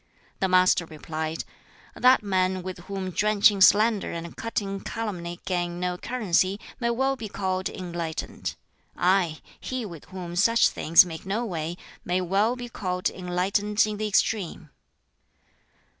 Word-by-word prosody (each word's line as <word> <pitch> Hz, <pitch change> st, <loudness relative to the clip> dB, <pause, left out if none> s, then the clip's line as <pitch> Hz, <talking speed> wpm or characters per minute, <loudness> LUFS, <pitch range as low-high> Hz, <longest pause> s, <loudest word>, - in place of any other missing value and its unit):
The 190 Hz, -, +2 dB
Master 185 Hz, -2 st, +4 dB
replied, 155 Hz, 0 st, -4 dB, 0.5 s
"That 255 Hz, -2 st, +5 dB
man 185 Hz, -2 st, 0 dB
with 185 Hz, -1 st, -6 dB
whom 195 Hz, -2 st, -4 dB
drenching 205 Hz, +1 st, +3 dB
slander 210 Hz, +2 st, +5 dB
and 170 Hz, 0 st, -6 dB
cutting 200 Hz, -3 st, -3 dB
calumny 180 Hz, -6 st, -5 dB
gain 175 Hz, -1 st, -2 dB
no 180 Hz, 0 st, -1 dB
currency 195 Hz, -3 st, 0 dB, 0.2 s
may 235 Hz, -2 st, 0 dB
well 265 Hz, +3 st, +1 dB
be 225 Hz, -5 st, -7 dB
called 190 Hz, -1 st, -2 dB
enlightened. 170 Hz, -3 st, -5 dB, 0.4 s
Ay, 175 Hz, -3 st, +2 dB, 0.2 s
he 255 Hz, -3 st, -4 dB
with 170 Hz, -7 st, -9 dB
whom 180 Hz, -2 st, -7 dB
such 230 Hz, +5 st, +4 dB
things 165 Hz, +3 st, +6 dB
make 160 Hz, -2 st, -7 dB
no 220 Hz, +5 st, -1 dB
way 170 Hz, -4 st, -4 dB, 0.3 s
may 180 Hz, +1 st, 0 dB
well 200 Hz, +6 st, +1 dB
be 245 Hz, -1 st, -6 dB
called 180 Hz, -5 st, -2 dB
enlightened 195 Hz, +4 st, 0 dB
in 210 Hz, -1 st, -4 dB
the 215 Hz, +1 st, -1 dB
extreme." 190 Hz, -6 st, 0 dB
185 Hz, 140 wpm, -26 LUFS, 175-210 Hz, 0.5 s, things